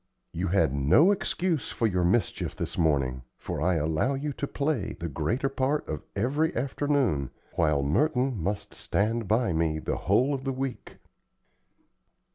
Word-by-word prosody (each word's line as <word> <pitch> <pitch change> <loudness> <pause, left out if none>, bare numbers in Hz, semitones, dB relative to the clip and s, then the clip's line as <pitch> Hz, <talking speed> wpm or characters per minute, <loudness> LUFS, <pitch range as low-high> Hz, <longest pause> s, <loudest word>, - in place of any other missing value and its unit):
You 90 +3 -2
had 95 -7 +2
no 80 - +5
excuse 180 -5 -1
for 115 - -1
your 90 -4 +1
mischief 100 +7 0
this - - -4
morning, 70 -6 +1 0.2
for - - -5
I 90 +2 +2
allow 80 - +1
you 145 +2 -3
to 140 - -4
play 140 -9 -2
the 85 - -3
greater 80 - -1
part 135 +2 -1
of 75 -2 -4
every 145 +10 0
afternoon, 130 - 0 0.2
while 75 -4 +2
Merton 125 - +1
must 100 +4 -3
stand 115 +1 -1
by 110 -3 +2
me 80 -1 +1
the 80 - -2
whole 125 +10 +2
of 135 -1 -3
the 135 0 -1
week." 130 -1 -5
110 Hz, 155 wpm, -27 LUFS, -, 0.2 s, no